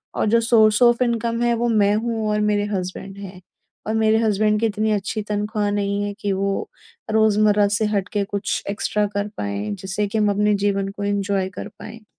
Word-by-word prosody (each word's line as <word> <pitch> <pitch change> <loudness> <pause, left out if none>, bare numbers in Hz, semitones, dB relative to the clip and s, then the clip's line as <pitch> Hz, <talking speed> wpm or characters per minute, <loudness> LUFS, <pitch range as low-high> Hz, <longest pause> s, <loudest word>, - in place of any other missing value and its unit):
और - - 0
जो 230 +1 +4
source 220 -1 +4
of 240 0 +4
income 235 -1 -1
है, 240 0 +2
वो 240 +1 0
मैं 205 -2 +3
हूँ 225 0 -2
और 210 - +1
मेरे 205 0 +1
हस्बैंड 190 +2 -6
हैं। 190 -2 -9 0.5
और 220 - -1
मेरे 220 0 +3
हस्बैंड 215 -1 +2
की 230 - +1
इतनी 215 0 0
अच्छी 210 +1 -1
तनख्वाह 210 0 -1
नहीं 200 0 -1
है 205 0 -3
कि 205 -1 -1
वो 195 +1 -2 0.4
रोज़मर्रा 210 -1 +3
से 215 - +1
हट 195 -2 0
के 205 -1 +1
कुछ 200 0 -3
एक्स्ट्रा 210 +1 0
कर 205 0 -1
पाएँ, 100 +1 -3
जिससे 195 - -3
कि 210 +2 -3
हम 210 -1 +3
अपने 210 +1 +2
जीवन 195 -1 0
को 200 +1 -7
एन्जॉय 200 -1 -1
कर - - -5
पाएँ। 225 -1 -10
210 Hz, 200 wpm, -21 LUFS, 200-220 Hz, 0.5 s, जो